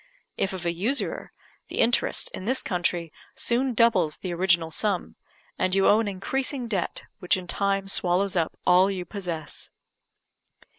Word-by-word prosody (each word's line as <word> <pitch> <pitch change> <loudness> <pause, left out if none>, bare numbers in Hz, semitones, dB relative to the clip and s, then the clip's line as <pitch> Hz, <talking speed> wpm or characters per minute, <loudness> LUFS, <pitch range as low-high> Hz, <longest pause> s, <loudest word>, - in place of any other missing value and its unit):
If 190 - -1
of 185 -2 -6
a 170 - +1
usurer, 225 +11 -2 0.4
the - - -7
interest, 240 - +2
in 185 - -6
this 260 +4 +1
country, 175 -2 -1 0.2
soon 250 +1 0
doubles 205 -10 +3
the 180 -2 -4
original 170 -2 +2
sum, 200 0 -1 0.4
and 185 0 +1
you 195 - +4
owe 210 - +6
an 225 - 0
increasing 250 +6 -2
debt, 195 -6 -2 0.2
which 180 - +2
in 185 - -6
time 195 +1 0
swallows 190 +1 +1
up 165 -3 0
all 185 +2 +5
you 185 -2 -3
possess. 170 -5 -4
190 Hz, 155 wpm, -26 LUFS, 175-215 Hz, 0.4 s, owe